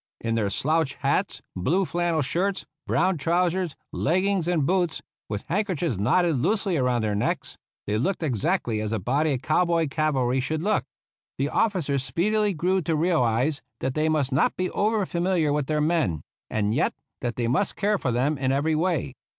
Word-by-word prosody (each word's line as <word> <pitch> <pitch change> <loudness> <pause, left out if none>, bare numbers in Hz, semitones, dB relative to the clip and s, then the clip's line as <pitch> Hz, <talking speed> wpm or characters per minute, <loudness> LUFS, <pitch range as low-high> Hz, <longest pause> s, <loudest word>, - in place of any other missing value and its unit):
In 115 0 -2
their 110 -3 +1
slouch 155 +6 0
hats, - - -1
blue 170 - +1
flannel 170 -3 0
shirts, 185 +8 -1 0.2
brown 145 - +2
trousers, 175 +1 +1 0.2
leggings 185 +2 +1
and 170 -5 +1
boots, 175 -1 0 0.3
with 105 -1 -3
handkerchiefs 175 - -1
knotted 160 - +2
loosely 195 - +1
around 125 -5 +1
their 105 -1 0
necks, 100 - -1 0.3
they 105 +1 0
looked 180 - -1
exactly 130 - 0
as 110 0 -3
a 110 - 0
body 140 +9 +1
of 125 - -6
cow 155 +6 +3
boy 170 -2 +1
cavalry 135 -4 0
should 155 +5 -2
look. 205 -8 +1 0.5
The 140 +2 0
officers 160 - +1
speedily 210 +7 +1
grew 185 +4 +1
to 165 0 0
realize 145 -4 +1 0.2
that 130 - -2
they 155 +2 +1
must 145 -3 +1
not 135 +5 +2
be 185 0 -1
over 215 -1 +1
familiar 175 -4 +1
with 145 -2 -1
their 150 -1 +1
men, 150 - +1 0.3
and 105 -1 0
yet 145 - +1 0.3
that 120 -2 -2
they 120 -1 -1
must 140 - 0
care 210 0 +1
for 125 - -1
them 135 +5 0
in 130 -1 +1
every 145 +4 +1
way. 155 -4 0
155 Hz, 180 wpm, -25 LUFS, 130-180 Hz, 0.5 s, cow